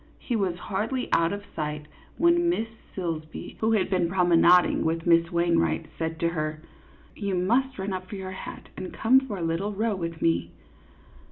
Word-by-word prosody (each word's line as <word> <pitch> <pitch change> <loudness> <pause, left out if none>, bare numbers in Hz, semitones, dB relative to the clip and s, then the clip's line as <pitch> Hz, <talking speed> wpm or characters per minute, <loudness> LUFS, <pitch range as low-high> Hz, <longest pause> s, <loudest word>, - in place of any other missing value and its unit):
He 245 - -3
was 190 -5 0
hardly 215 +8 -2
out 165 0 +3
of 205 0 -5
sight, 150 -1 -3 0.3
when 340 +1 +4
Miss 225 -10 0 0.3
Silsbee, 160 -4 -5
who 220 +1 +2
had 210 -4 +2
been 180 -3 +1
promenading 175 -1 +4
with 165 +1 -1
Miss 170 -1 +4
Wainwright, 170 - +1
said 160 0 -2
to 170 - +3
her: 155 -1 -3 0.5
"You 200 -2 -2
must 245 +9 +1
run 190 0 -3
up 185 0 -5
for - - -6
your 190 -1 -6
hat, 190 - -8
and 185 - -6
come 255 +4 +5
for 260 -7 -6
a 175 - -4
little 165 +6 -1
row 215 +1 0
with 165 -3 -4
me." 85 +1 +1
180 Hz, 180 wpm, -26 LUFS, 165-205 Hz, 0.5 s, come